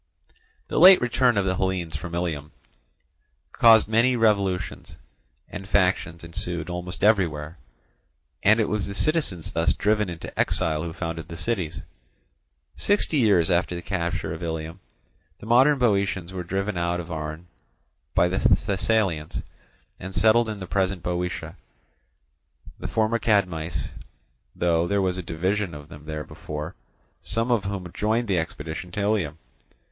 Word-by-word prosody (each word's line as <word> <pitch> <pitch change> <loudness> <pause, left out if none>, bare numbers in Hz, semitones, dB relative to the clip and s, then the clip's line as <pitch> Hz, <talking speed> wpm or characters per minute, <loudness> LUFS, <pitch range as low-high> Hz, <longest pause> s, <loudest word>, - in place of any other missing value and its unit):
The - - -1
late 185 +3 +10
return 125 -1 +2
of 100 - +2
the 95 -1 0
Hellenes 95 -4 -1
from 85 +2 -5
Ilium 80 -4 -3 1.0
caused 115 -1 +6
many 115 +4 +3
revolutions, 100 -6 0 0.5
and 95 +1 -8
factions 90 -4 +1
ensued 85 0 -4
almost 90 +1 -5
everywhere; 85 -7 +1 0.8
and 110 +3 +5
it 110 - +2
was 105 -2 -1
the 100 - -6
citizens 145 - 0
thus 80 +1 +2
driven 105 -1 +1
into 85 -1 -7
exile 80 -1 +1
who 85 0 -4
founded 80 -1 -5
the 85 -2 -8
cities. 85 - -2 0.9
Sixty 205 -6 +1
years 100 -9 +4
after 90 0 +1
the 85 - -5
capture 85 -3 -2
of 80 - -7
Ilium, 80 +1 -4 0.6
the - - -11
modern 130 +6 +5
Boeotians 100 -6 0
were 90 -1 -4
driven 95 +2 -2
out 85 0 0
of 85 0 -7
Arne 80 +1 -5 0.7
by 90 - +4
the 90 +2 -1
Thessalians, 100 -5 +1 0.6
and 95 +1 -7
settled 110 +4 +4
in 105 -2 -5
the 95 - -5
present 95 0 -1
Boeotia, 90 0 -3 1.2
the - - -4
former 110 +1 +1
Cadmeis; 90 -7 0 0.7
though 85 -1 +1
there 100 +1 +1
was 95 -1 0
a - - -2
division 90 +2 -2
of 75 0 -11
them 75 0 -12
there 75 -1 -4
before, 75 +3 -7 0.5
some 115 +3 0
of 110 -5 +1
whom 95 -3 -5
joined 110 +3 0
the 95 -4 +2
expedition 80 +2 -5
to - - -3
Ilium. 100 -7 0
90 Hz, 145 wpm, -25 LUFS, 85-105 Hz, 1.2 s, late